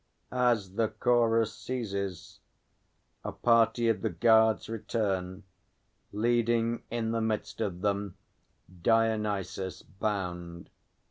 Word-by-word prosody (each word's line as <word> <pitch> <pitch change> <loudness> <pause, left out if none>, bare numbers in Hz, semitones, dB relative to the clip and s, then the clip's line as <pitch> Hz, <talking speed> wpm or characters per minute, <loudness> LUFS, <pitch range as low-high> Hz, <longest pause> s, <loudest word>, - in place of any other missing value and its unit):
[As 120 -7 +1
the 115 - +3
Chorus 115 0 +2
ceases, 100 -5 -5 0.8
a - - -3
party 115 0 +3
of 115 - +1
the 110 - 0
guards 110 +4 +4
return, 100 -4 -2 0.7
leading 115 +1 +1
in 115 -1 -2
the 115 0 0
midst 110 0 -2
of 95 -5 -2
them 100 -2 -1 0.6
DIONYSUS, 105 -4 0
bound. 90 -4 -4
110 Hz, 95 wpm, -29 LUFS, 100-115 Hz, 0.8 s, guards